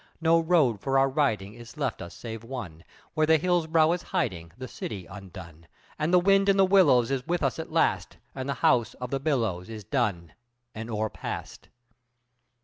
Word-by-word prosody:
No 165 0 +4
road 160 - +2
for 135 0 +1
our 135 0 +4
riding 110 -8 0
is 120 +2 -13
left 135 -6 -2
us 85 +1 -9
save 115 -1 -7
one, 105 -10 -7 0.3
Where 155 0 +1
the 160 0 +6
hills' 175 0 +1
brow 160 0 +4
is 175 0 -1
hiding 95 - -3
the 130 0 -7
city 100 -6 -6
undone, 85 -4 -11 0.3
And 155 +2 0
the 180 - +6
wind 195 +2 +4
in 195 - +4
the 195 - +6
willows 150 -11 +4
is 130 -2 -2
with 175 -2 -1
us 135 -3 0
at - - -6
last, - - 0 0.2
And 130 0 -5
the 140 - -1
house 120 0 +3
of 125 -1 -7
the 135 - -1
billows 115 - -1
is 110 -2 -7
done 100 - -2 0.4
and 110 +1 -7
o'er 110 -1 -2
past. - - -7
130 Hz, 195 wpm, -27 LUFS, 110-160 Hz, 0.4 s, the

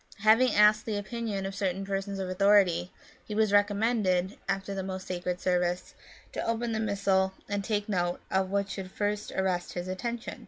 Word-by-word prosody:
Having 225 +4 +5
asked 210 +1 +5
the 215 -2 -1
opinion 205 -1 -3
of 195 - -4
certain 195 -1 -2
persons 195 0 -3
of 190 -1 -3
authority, 185 -2 +3 0.3
he 210 - -6
was 215 -1 +2
recommended, 205 -2 +2
after 195 0 -1
the 195 - -3
most 190 0 -5
sacred 180 0 -3
service, 180 -1 0 0.4
to - - -3
open 230 +1 -1
the 220 - -1
Missal 195 -3 +1
and 205 0 -2
to - - -8
take 210 -2 0
note 175 -4 0
of 190 0 +1
what 200 0 0
should 190 -1 -6
first 205 +1 -2
arrest 185 -2 -1
his 175 0 -4
attention. 235 +5 -4
195 Hz, 185 wpm, -29 LUFS, 185-210 Hz, 0.4 s, Having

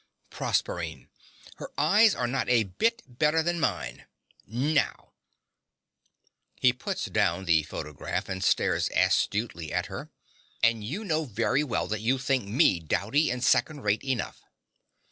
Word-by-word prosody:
PROSERPINE. 80 -7 -2 0.5
Her - - -7
eyes 205 +9 +5
are 125 - -1
not 125 +2 -1
a 120 -3 +4
bit 230 - -1
better 150 +5 +1
than 170 +1 -1
mine - - -2 0.4
now! 145 +7 -1 1.4
(He 125 -1 +3
puts 125 - -4
down 95 +3 0
the 80 -3 +4
photograph 75 -1 -5
and 95 0 -4
stares - - +2
austerely 95 -7 +1
at 90 +1 0
her.) 140 +9 -6 0.5
And 115 -1 +3
you 170 - -4
know 160 -4 0
very 115 +4 0
well 130 -6 -1
that 110 -1 -3
you 125 +4 +2
think 130 -3 0
me 100 -4 +3
dowdy 110 - +1
and 125 0 -2
second 135 +4 +2
rate 105 -1 0
enough. 130 -3 -3
120 Hz, 140 wpm, -27 LUFS, 100-150 Hz, 1.4 s, eyes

